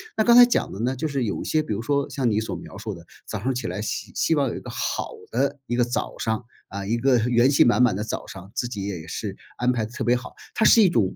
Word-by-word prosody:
那 220 - +3
刚 235 +1 +6
才 245 0 +10
讲 240 - 0
的 95 - -7
呢， 130 +2 0
就 155 +5 -2
是 140 -4 -1
有 105 - -2
一 - - -6
些， 155 0 +1
比 130 - -3
如 105 - -3
说 140 +2 0
像 135 -4 0
你 105 - +1
所 110 - -4
描 - - -10
述 - - -5
的， - - -12 0.2
早 - - -4
上 130 +6 -1
起 120 -2 -3
来 95 +4 -4
希 110 - -4
希 165 - +1
望 140 -2 +2
有 - - -5
一 - - -5
个 - - -10
好 - - -2 0.2
的 140 +4 0
一 120 - -2
个 120 - +3
早 120 +1 -3
上， 110 +1 -2 0.2
啊， 100 0 -6
一 115 +4 0
个 130 +1 +3
元 120 +2 +3
气 140 - +5
满 120 +1 +4
满 120 -6 +4
的 105 - -2
早 110 - -5
上， 95 +1 -10
自 120 - -2
己 100 -5 -5
也 90 -6 -5
是 - - -4 0.2
安 125 +1 +2
排 115 -3 -1
得 110 - -11
特 - - -4
别 120 - +3
好， 125 +1 -7 0.2
它 - - 0
是 225 - +7
一 195 - +7
种 110 - +1
120 Hz, 325 characters per minute, -24 LUFS, 110-140 Hz, 0.2 s, 才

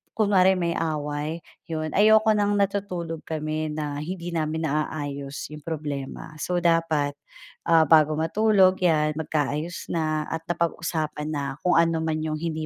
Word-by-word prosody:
kunwari 190 -3 +4
may 170 -1 0
away 150 0 -2 0.3
yun, 155 -1 -3
ayoko 220 +1 +5
ng 205 0 +2
natutulog 185 -5 -2
kami 155 0 -3
na 150 -2 -3
hindi 175 +1 -5
namin 160 0 -1
naaayos 145 -2 -3
yung 150 - -9
problema, 150 -1 -5
so 180 - -1
dapat, 160 -4 +2 0.5
ah, 165 -1 +6
bago 155 -1 +5
matulog 190 +2 +3
yan 155 -3 +3
magkaayos 155 +2 -2
na 155 -2 0
at 160 0 -3
napag-usapan 160 -3 -2
na 145 -2 -2 0.2
kung 180 - +4
anuman 160 -1 +1
yung 155 - -2
hindi 160 -1 -3
160 Hz, 140 wpm, -25 LUFS, 155-170 Hz, 0.5 s, ah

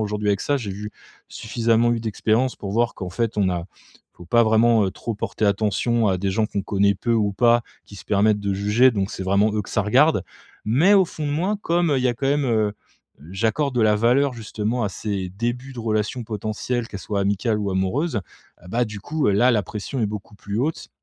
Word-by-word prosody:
aujourd'hui 105 -1 -2
avec 100 -1 +1
ça 145 - 0
j'ai 110 -7 -4
vu 105 +2 -6 0.4
suffisamment 115 +1 +1
eu 115 - 0
d'expérience 115 +3 0
pour 100 - -6
voir 120 +1 +1
qu'en 90 -2 -6
fait 115 +2 -2
on 100 -2 +2
a 85 -2 -3 0.5
faut 90 - -14
pas 120 +6 +4
vraiment, 110 0 +4
heu, - - -1
trop 115 - -5
porter 105 - -3
attention 110 +3 +1
à 95 - +1
des 100 +1 -1
gens 110 +2 +1
qu'on 100 -1 -3
connaît 100 0 +2
peu 115 +5 -2
ou 105 -3 +1
pas, 120 +2 +3 0.2
qui 100 - -13
se - - -11
permettent 105 +1 +2
de 100 -1 -1
juger 105 +6 +4
donc 100 -2 -2
c'est 95 - -5
vraiment 100 +3 +2
eux 105 -1 -1
que - - -12
ça 110 - +1
regarde. 125 - +3 0.4
Mais 150 - +4
au 195 - +6
fond 155 -3 -6
de 145 - -1
moi 185 +7 0
comme, 170 -3 +1
il 130 - 0
y 130 - +2
a 120 - 0
quand 135 +4 -3
même, 145 0 +1
heu 110 -4 +1 0.6
j'accorde 115 +8 0
de 120 - +1
la 105 -1 +4
valeur 125 +4 +2
justement 110 +1 -3
à - - 0
ces 95 -1 -4
débuts 120 +6 -4
de 120 - -7
relations 110 +2 -1
potentielles, 110 +2 -3
qu'elles 100 - -7
soient 100 0 -2
amicales 105 +3 0
ou 100 -2 -2
amoureuses, 120 - -1 0.5
heu, 90 - -13
bah, 120 +4 +1
du 105 -2 -8
coup 155 +7 -2
là, 120 +6 +4
la 105 -4 +2
pression 110 +5 -5
est 110 - +2
beaucoup 105 0 -7
plus 100 +2 -5
haute 155 +4 -2
110 Hz, 230 wpm, -22 LUFS, 100-120 Hz, 0.6 s, au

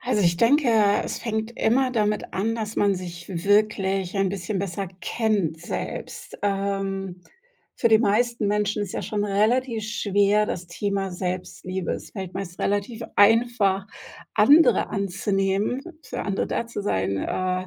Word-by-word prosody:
Also, 240 -4 0
ich 170 -1 +3
denke, 275 - +4 0.3
es - - -4
fängt 220 0 -3
immer 255 +3 +2
damit 210 -3 -1
an, 220 +4 0
dass 220 -1 -4
man 200 -1 +3
sich 175 -2 -7 0.2
wirklich 200 -2 +2
ein 195 -1 +2
bisschen 195 +1 -3
besser 195 0 -3
kennt 205 -9 0
selbst. 175 - -6
Ähm, 195 -2 -2 0.5
für - - +2
die 220 -1 +6
meisten 235 +1 +1
Menschen 210 0 0
ist 200 - -5
ja - - -3
schon 205 -1 -2
relativ 225 +4 +1
schwer, 205 0 +2
das 180 -3 -4
Thema 195 +2 -2
Selbstliebe. 185 0 -4
Es - - -7
fällt 190 -3 -7
meist 185 -2 -6
relativ 205 +4 -1
einfach 205 -3 +4 0.5
andere 285 - +5
anzunehmen, 195 +3 0 0.2
für - - -6
andere 200 -1 -1
da 235 - -2
zu 230 -3 -5
sein, 100 - 0
äh, 185 - -2
200 Hz, 145 wpm, -24 LUFS, 190-220 Hz, 0.5 s, die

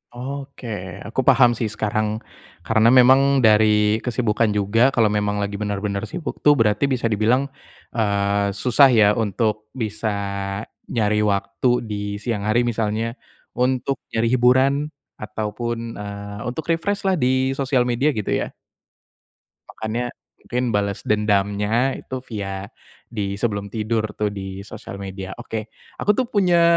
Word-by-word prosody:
Oke. 135 +1 -7 0.4
Aku 115 +5 -1
paham 130 -3 +6
sih 115 -1 -2
sekarang, 110 0 0 0.6
karena 110 +3 +4
memang 130 +2 +7 0.2
dari 105 0 +4
kesibukan 115 -2 +1
juga 110 +6 +3
kalau 120 -4 +2
memang 105 -1 0
lagi 100 0 -2
bener-bener 100 -1 -2
sibuk 170 -2 -6
tuh 145 -1 +6
berarti 110 +3 +2
bisa 125 -2 -2
dibilang, 115 +6 +2 0.5
eee, 100 -2 +1
susah 125 +7 +4
ya 110 -5 +5
untuk 110 0 -1
bisa 110 0 -2 0.8
nyari 105 -2 +1
waktu 100 +2 0 0.2
di 105 -1 -4
siang 110 -1 -3
hari, 110 +4 +2
misalnya 115 0 -1 0.4
untuk 130 +2 0
nyari 115 +1 0
hiburan 130 +2 +4 0.5
ataupun, 110 +2 -3 0.2
eee, 100 0 -7
untuk 145 +5 -5
refresh 200 +5 -2
lah 190 - +3
di 130 -4 +1
sosial 135 -2 +1
media 125 +4 +1
gitu 110 -9 -2
ya? - - -1 1.2
Makanya, 115 +3 -3 0.3
mungkin 125 -1 -2
bales 100 -1 -1
dendamnya 105 +3 +1
itu 130 -1 -7
via 100 -2 -5 0.4
di 100 -4 -3
sebelum 100 -2 -2
tidur 110 +1 -1
tuh, 105 -1 -1
di 95 -1 -6
sosial 100 - -9
media. 95 0 -6
Oke, 110 -1 -5 0.3
aku 210 - +2
tuh 255 - +1
punya 180 -4 +4
110 Hz, 135 wpm, -22 LUFS, 105-125 Hz, 1.2 s, memang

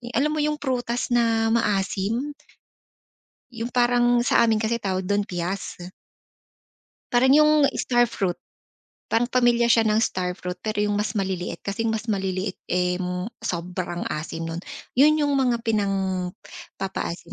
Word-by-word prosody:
alam 300 +2 +2
mo 310 - -1
yung 300 0 +1
prutas 245 -3 -2
na 225 -2 +2
maasim? 215 +4 0 1.2
Yung 230 +1 -4
parang 245 0 +3
sa - - +4
amin 225 -1 +2
kasi 225 +2 -1
tawag 190 -2 -2
dun, 205 +2 +1
piyas. 185 -1 -4 1.3
Para 245 +1 +4
niyong 300 0 +5
star 240 -1 +3
fruit. 190 -6 -2 0.7
Parang 240 +2 +1
pamilya 240 -1 +3
siya 225 -1 +4
ng 215 +1 +3
star 180 -3 -2
fruit 180 -1 -6
pero 215 -1 -1
yung 205 - 0
mas 215 +2 -2
maliliit, 190 -3 -3
kasi 215 +3 -1
mas 220 0 -2
maliliit 190 -1 -2
eh 180 0 0 0.4
sobrang 175 0 -3
asim 160 +2 -4
nun. 165 +1 -4 0.3
Yun 300 +3 +4
yung 290 - +1
mga 250 -4 +1
pinangpapaasim 190 -3 -3
220 Hz, 135 wpm, -24 LUFS, 190-240 Hz, 1.3 s, niyong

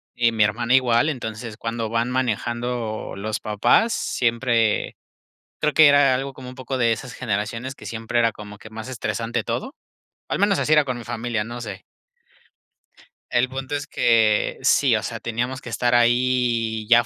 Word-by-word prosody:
y 120 -1 +3
mi 110 -2 +2
hermana 115 +4 0
igual, 130 +3 +3
entonces 115 -4 -5
cuando 115 -1 -3
van 115 +2 0
manejando 120 -2 -2
los 105 +2 -3
papás 105 - +2
siempre, 115 -2 0 0.6
creo 150 -1 +1
que 155 -2 +7
era 145 -2 +5
algo 135 +1 -4
como 130 -1 -10
un 130 - -11
poco 130 0 -4
de 115 -2 +3
esas 125 +2 -7
generaciones 115 +3 -3
que - - -13
siempre 115 +1 -2
era 115 -1 +3
como 105 0 -11
que 110 - -13
más 110 +2 -8
estresante 115 -2 -3
todo. 120 - -4 0.5
Al - - -2
menos 200 -1 +3
así - - -1
era 150 -2 +5
con 130 -2 -3
mi 120 - -8
familia, 120 -1 -3
no 120 +2 -7
sé. 105 -4 -7 1.5
El 130 - +2
punto 135 +2 -5
es 145 0 -4
que 110 -5 +2
sí, - - +4
o - - -3
sea, - - -5
teníamos 125 +3 -3
que 120 - -8
estar 120 +1 +1
ahí 120 -2 +2
ya 120 0 +6
120 Hz, 175 wpm, -23 LUFS, 115-130 Hz, 1.5 s, que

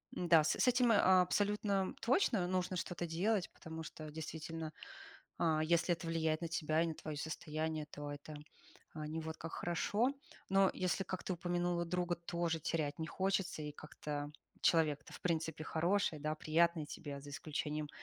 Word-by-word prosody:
м-да, 170 -3 +5
с - - +2
этим, 245 -1 +5
э, - - +6
абсолютно 195 +1 +3
точно 230 - +3
нужно 185 0 0
что-то 175 -1 -2
делать, 180 +4 +1
потому 160 0 -7
что, 155 0 -8
действительно, 160 +1 -5 0.7
а, 155 -2 +3
если 170 +2 +3
это 170 0 -8
влияет 160 -1 +1
на 170 - -2
тебя 160 -1 +1
и - - +2
на 160 - -3
твоё 155 -1 -6
состояние, 155 0 -3
то 145 0 -5
это 145 +1 -7 0.6
не 155 +1 -3
вот 160 0 -5
как 165 - -6
хорошо. 205 +7 +1 0.4
Но 195 0 +5
если, 185 +1 0
как 185 0 -4
ты - - -1
упомянула, 175 0 0
друга 175 0 0
тоже 170 -1 -1
терять 150 -2 -1
не 160 - -2
хочется, 190 -2 0
и 150 - -4
как-то, 145 -1 -5 0.3
человек-то 150 -3 +2
в - - -9
принципе 160 -2 -1
хороший, 170 0 +1
да, 155 +1 -1
приятный 160 0 +2
тебе, 145 -1 -6
за 145 +1 -10
исключением 150 +1 -3
165 Hz, 165 wpm, -36 LUFS, 155-180 Hz, 0.7 s, э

